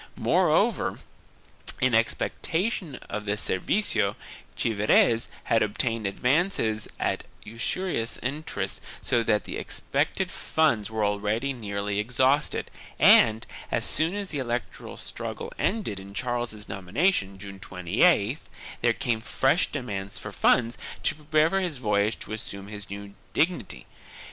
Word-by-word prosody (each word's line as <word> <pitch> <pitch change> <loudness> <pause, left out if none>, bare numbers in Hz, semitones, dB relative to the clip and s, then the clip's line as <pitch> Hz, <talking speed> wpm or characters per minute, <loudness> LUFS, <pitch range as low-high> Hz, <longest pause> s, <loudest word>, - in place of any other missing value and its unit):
Moreover, - - +2 0.8
in 130 -1 +3
expectation 160 - 0
of 105 0 -4
the 105 0 0
servicio, 105 - +1 0.4
Chievres 115 +1 +3 0.2
had 115 - +2
obtained 110 +1 0
advances 125 - +1
at - - 0 0.2
usurious 115 - -2
interest 145 +5 -3 0.2
so 120 - +2
that 110 -2 +2
the - - -5
expected - - -1
funds 120 -10 +1
were 110 -1 0
already 105 +6 0
nearly 100 -3 -2
exhausted 130 +6 +1 0.3
and, 110 0 +6 0.3
as - - +1
soon 165 +5 +1
as 200 -2 -3
the 145 - -2
electoral 120 -2 -4
struggle - - -6
ended 195 - 0
in 100 +1 -11
Charles's 120 -3 -2
nomination, 100 - 0
June 100 0 -9
28th, 105 - +2 0.4
there 120 -1 +4
came 115 -1 -1
fresh 135 +7 +2
demands 100 -7 -4
for 105 +1 -7
funds 115 +3 +3 0.2
to - - +2
prepare 155 0 +2
for 195 - +2
his 175 -7 -2
voyage 105 -2 +1
to - - -7
assume 100 -2 -6
his 105 -1 -8
new 100 0 -7 0.2
dignity. 170 - 0
115 Hz, 125 wpm, -27 LUFS, 105-140 Hz, 0.8 s, and